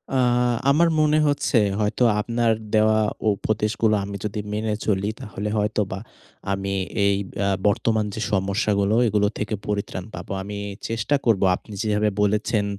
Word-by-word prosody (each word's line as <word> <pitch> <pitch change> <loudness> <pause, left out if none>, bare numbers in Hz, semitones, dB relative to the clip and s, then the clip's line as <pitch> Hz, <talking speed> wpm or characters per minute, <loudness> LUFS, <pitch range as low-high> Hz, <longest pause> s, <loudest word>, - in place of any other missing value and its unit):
আ - - +3 0.5
আমার 160 +5 +4
মনে 155 0 +3
হচ্ছে 145 -2 +1 0.2
হয়তো 105 +3 +1 0.2
আপনার 115 +1 +1 0.2
দেওয়া 110 0 +4 0.3
উপদেশগুলো 110 +2 0
আমি 100 0 -6
যদি 105 0 -3
মেনে 110 0 -1
চলি, 100 -1 +1
তাহলে 105 -4 -5
হয়তোবা 105 -2 -1 0.5
আমি 100 0 -2 0.3
এই 100 0 +3 0.3
আ - - +1 0.2
বর্তমান 110 +1 +1
যে 110 - -4
সমস্যাগুলো 100 +1 +1
এগুলো 105 -1 +2
থেকে 105 +1 -2
পরিত্রাণ 100 -3 -3
পাবো। - - -8
আমি 100 +1 -6 0.3
চেষ্টা 115 +5 0
করব 115 -5 +3
আপনি 105 - -12
যেভাবে 105 0 +1
বলেছেন 105 +1 +1
105 Hz, 140 wpm, -23 LUFS, 100-110 Hz, 0.5 s, আমার